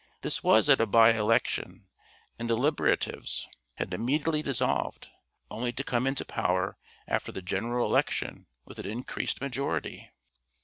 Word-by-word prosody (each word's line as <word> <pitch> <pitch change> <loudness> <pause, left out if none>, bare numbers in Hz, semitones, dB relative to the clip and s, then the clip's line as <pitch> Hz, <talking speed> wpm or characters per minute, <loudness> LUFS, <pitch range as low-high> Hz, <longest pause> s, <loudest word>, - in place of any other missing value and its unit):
This - - -1
was 110 +6 +5
at 135 -4 +6
a 115 - +2
by 115 +2 +7
election, 110 +1 0 0.5
and 115 0 -3
the 115 - +2
Liberatives 145 +5 0 0.3
had 90 - -4
immediately 150 - 0
dissolved, 140 -6 -1 0.4
only 120 +2 -2
to 135 - -3
come 125 -1 0
into 135 0 -1
power - - 0 0.3
after - - -1
the 95 - -7
General 120 +6 -1
Election - - 0 0.2
with - - -12
an - - -5
increased 120 +4 -3
majority. 130 - -3
120 Hz, 140 wpm, -29 LUFS, 110-135 Hz, 0.5 s, by